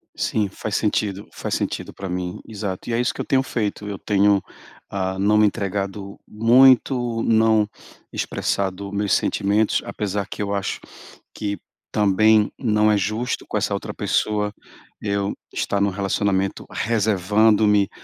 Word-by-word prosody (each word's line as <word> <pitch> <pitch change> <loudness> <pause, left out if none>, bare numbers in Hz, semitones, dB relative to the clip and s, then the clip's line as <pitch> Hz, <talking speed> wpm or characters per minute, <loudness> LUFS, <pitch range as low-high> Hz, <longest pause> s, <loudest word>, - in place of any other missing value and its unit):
Sim, 105 -2 0
faz 100 +2 -5
sentido, 105 -2 -1
faz - - -3
sentido - - -3
pra 100 - -7
mim, 90 +2 -4
exato. 100 -4 -5
E 120 - -2
é 115 - +1
isso 120 - +1
que - - -14
eu - - -2
tenho 130 - +3
feito, 105 -5 -3
eu 100 - -4
tenho, 100 -1 +2 0.5
hã, 95 -1 -2
não 105 +2 +3
me 105 - +6
entregado 100 0 -4
muito, 120 +1 +4
não 110 -1 +3 0.4
expressado 100 0 -2
meus 100 -2 -1
sentimentos, 105 +2 +1
apesar 100 -1 -3
que - - -9
eu 100 0 -2
acho 100 -1 -2 0.5
que 100 -1 -3 0.3
também 105 +1 +4
não 105 -3 +3
é 105 - +3
justo 110 +5 -2
com - - -2
essa - - 0
outra - - -3
pessoa 105 -1 0 0.5
eu 100 -1 -1 0.2
estar 100 -1 -1
num 100 - +3
relacionamento 95 0 -1
reservando-me 105 -1 +2
105 Hz, 145 wpm, -22 LUFS, 100-110 Hz, 0.5 s, me